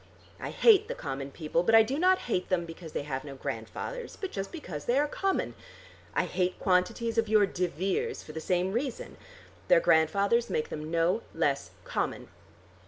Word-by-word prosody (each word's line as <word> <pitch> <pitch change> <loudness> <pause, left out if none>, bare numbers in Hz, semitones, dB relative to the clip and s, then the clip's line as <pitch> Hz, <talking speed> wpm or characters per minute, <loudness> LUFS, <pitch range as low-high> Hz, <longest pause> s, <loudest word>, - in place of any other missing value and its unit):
I - - -4
hate 430 -2 +5
the - - -4
common 135 - -5
people, 155 +3 -1
but 225 +6 +4
I 225 - +9
do 265 +7 -2
not 370 +2 +5
hate 185 -7 -1
them 180 -2 +1
because 165 -1 -10
they - - -2
have 135 -2 -4
no 140 -2 -8
grandfathers, 130 - -5
but 385 - -4
just 195 -1 -4
because 215 - -7
they 245 - +2
are 295 +1 +3
common. 385 +5 -1 0.6
I - - +2
hate 180 0 -1
quantities 225 +5 +1
of 225 -2 0
your 215 -1 +5
de 180 -2 -1
Veres 185 +4 -2
for - - -10
the 160 +1 -6
same 180 +3 0
reason. 245 +4 -3 0.5
Their - - +6
grandfathers 200 - +3
make 155 - -1
them 155 0 -5
no 170 +6 +2
less 145 -4 0
common. - - -3
185 Hz, 185 wpm, -29 LUFS, 160-240 Hz, 0.6 s, I